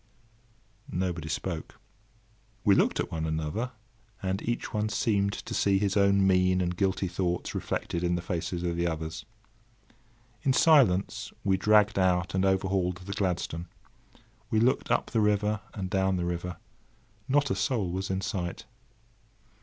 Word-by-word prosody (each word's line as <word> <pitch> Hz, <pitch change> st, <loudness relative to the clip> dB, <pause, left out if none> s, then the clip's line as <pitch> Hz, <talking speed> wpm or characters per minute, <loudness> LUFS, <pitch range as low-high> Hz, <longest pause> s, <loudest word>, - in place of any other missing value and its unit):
Nobody 90 Hz, -3 st, -2 dB
spoke. 80 Hz, 0 st, -4 dB, 0.8 s
We 100 Hz, -, +5 dB
looked -, -, +2 dB
at -, -, -2 dB
one 80 Hz, -1 st, -2 dB
another, 80 Hz, +11 st, -2 dB, 0.5 s
and 95 Hz, +1 st, -1 dB
each 120 Hz, 0 st, -3 dB
one 105 Hz, 0 st, 0 dB
seemed 100 Hz, -2 st, +1 dB
to -, -, -6 dB
see 100 Hz, -1 st, +3 dB
his 100 Hz, 0 st, 0 dB
own 100 Hz, -1 st, +4 dB
mean 90 Hz, -1 st, +3 dB
and 90 Hz, -1 st, -1 dB
guilty 95 Hz, +1 st, 0 dB
thoughts 90 Hz, 0 st, -2 dB
reflected 85 Hz, -, -3 dB
in 90 Hz, 0 st, +1 dB
the 85 Hz, -, -2 dB
faces 85 Hz, 0 st, -3 dB
of 85 Hz, -1 st, -1 dB
the 85 Hz, 0 st, +1 dB
others. 80 Hz, 0 st, -4 dB, 1.2 s
In 135 Hz, -, +2 dB
silence, 130 Hz, -, +4 dB
we 95 Hz, -1 st, +3 dB
dragged 105 Hz, +1 st, +4 dB
out 90 Hz, -1 st, +2 dB
and 95 Hz, 0 st, +1 dB
overhauled 95 Hz, -1 st, +1 dB
the 90 Hz, +2 st, -6 dB
Gladstone. 90 Hz, -3 st, -2 dB, 0.8 s
We 110 Hz, -, +2 dB
looked 125 Hz, +4 st, +2 dB
up -, -, +1 dB
the 115 Hz, -, +2 dB
river 105 Hz, 0 st, +1 dB
and 95 Hz, -3 st, -3 dB
down 95 Hz, 0 st, +1 dB
the 90 Hz, -1 st, -1 dB
river; 90 Hz, +1 st, -3 dB, 0.7 s
not 145 Hz, +1 st, +2 dB
a -, -, +1 dB
soul 95 Hz, -1 st, 0 dB
was 95 Hz, +2 st, -3 dB
in 95 Hz, 0 st, -1 dB
sight! 95 Hz, +3 st, -4 dB
95 Hz, 155 wpm, -28 LUFS, 90-100 Hz, 1.2 s, We